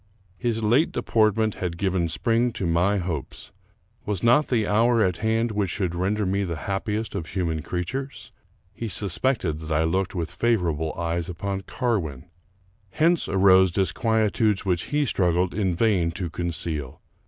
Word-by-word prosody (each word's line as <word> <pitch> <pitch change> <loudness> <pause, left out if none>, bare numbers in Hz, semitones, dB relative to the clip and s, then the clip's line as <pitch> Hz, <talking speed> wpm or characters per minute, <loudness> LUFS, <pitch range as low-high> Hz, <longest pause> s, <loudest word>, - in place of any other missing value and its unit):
His 115 -2 -1
late 120 +10 +3
deportment 110 -1 +1
had 85 -2 -4
given 95 -3 0
spring 115 +7 +1
to 95 - -3
my 90 +5 +2
hopes. 85 -6 -5 0.5
Was 100 -4 -3
not 120 +6 +4
the 115 -4 +1
hour 115 +2 +3
at 90 -2 0
hand 110 +1 0
which 100 -3 -1
should 90 -1 -2
render 100 +4 0
me 100 +2 0
the 85 -3 -3
hap 95 +1 -2
piest 110 0 -2
of 80 - -4
human 80 -4 -2
creatures? 90 - -5 0.4
He 115 +3 -5
suspected 100 - -1
that 80 0 -7
I 80 +1 +2
looked 90 +4 -1
with 85 -3 -3
favorable 85 -9 0
eyes 85 +1 -2
upon 95 +3 -3
Carwin. 95 - -2 0.6
Hence 165 - +1
arose 95 -1 +5
disquietudes 105 +2 +1
which 90 -2 0
he 150 0 0
struggled 90 -5 +1
in 95 -4 0
vain 95 -4 +2
to 85 -2 -4
conceal. 80 -6 -4
95 Hz, 155 wpm, -24 LUFS, 85-110 Hz, 0.6 s, arose